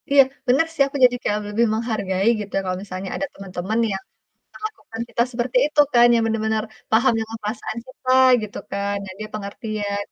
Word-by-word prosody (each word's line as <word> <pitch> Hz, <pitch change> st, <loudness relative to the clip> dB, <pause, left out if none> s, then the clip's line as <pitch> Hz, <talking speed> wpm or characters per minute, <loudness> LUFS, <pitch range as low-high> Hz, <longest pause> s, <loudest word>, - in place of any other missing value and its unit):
Iya 280 Hz, 0 st, +8 dB, 0.3 s
benar 265 Hz, +6 st, +4 dB
sih, 320 Hz, -, -2 dB
aku 275 Hz, -, -5 dB
jadi 245 Hz, 0 st, +3 dB
kayak 210 Hz, -, +1 dB
le -, -, -8 dB
lebih 225 Hz, +3 st, +2 dB
menghargai 210 Hz, -4 st, -1 dB
gitu, 205 Hz, -1 st, -7 dB
kalau 185 Hz, -1 st, -2 dB
misalnya 190 Hz, -1 st, -6 dB
ada 285 Hz, -, -2 dB
teman-teman 195 Hz, +3 st, -3 dB
yang 190 Hz, 0 st, -5 dB, 0.5 s
melakukan 425 Hz, -, -7 dB
kita -, -, 0 dB
seperti 245 Hz, +1 st, -1 dB
itu 300 Hz, 0 st, -2 dB
kan. 240 Hz, -1 st, +7 dB
Ya -, -, +4 dB
benar 225 Hz, -1 st, 0 dB
benar, 220 Hz, 0 st, +1 dB, 0.3 s
paham 235 Hz, +3 st, +4 dB
dengan 225 Hz, 0 st, -5 dB
perasaan 215 Hz, +2 st, -4 dB
kita 260 Hz, 0 st, -3 dB, 0.3 s
gitu 210 Hz, -, -7 dB
kan, 200 Hz, +1 st, -1 dB
nah 190 Hz, -, -8 dB
dia 215 Hz, -, -5 dB
pengertian 205 Hz, 0 st, -4 dB
220 Hz, 190 wpm, -22 LUFS, 200-240 Hz, 0.5 s, Iya